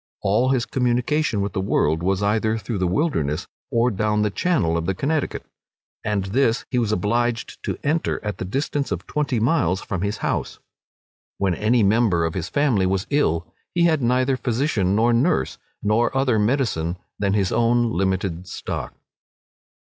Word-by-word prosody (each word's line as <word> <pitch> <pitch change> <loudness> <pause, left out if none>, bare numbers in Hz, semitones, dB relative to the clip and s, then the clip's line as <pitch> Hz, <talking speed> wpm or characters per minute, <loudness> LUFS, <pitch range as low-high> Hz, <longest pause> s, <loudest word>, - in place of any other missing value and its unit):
All 105 +6 +2
his 130 -3 +1
communication 125 -1 0
with 100 -2 -2
the 95 - -1
world 80 -4 +1
was 95 +2 0
either 110 +2 +1
through 110 -1 -4
the 90 - +1
wilderness, 85 - 0 0.2
or 120 +1 +2
down 105 +1 +1
the 105 - 0
channel 100 - +1
of 85 0 -2
the 95 - 0
Connecticut; 150 - -1 0.6
and 105 -2 0
this 115 +3 +1
he 125 - +2
was 115 -3 0
obliged 115 +4 -1
to - - -2
enter 155 +3 0
at 105 - -3
the - - -3
distance 140 +6 -2
of - - -3
twenty 145 -5 -1
miles 110 - +2
from 95 -3 -4
his 100 +1 -1
house. - - -2 0.8
When 95 -2 +1
any 110 +5 +2
member 100 -5 +3
of 80 - -2
his 90 -2 -3
family 125 -10 +2
was 95 0 0
ill, 90 - +1 0.3
he 175 - +3
had 160 -4 +3
neither 130 +2 +2
physician 115 -7 0
nor 115 +2 +3
nurse, 130 +10 +1 0.2
nor 115 +5 +2
other 130 -5 +2
medicine 105 - 0 0.2
than 100 -1 +1
his 95 -3 +1
own 120 0 +2
limited 95 -2 -1
stock. - - -5
110 Hz, 170 wpm, -22 LUFS, 95-125 Hz, 0.8 s, member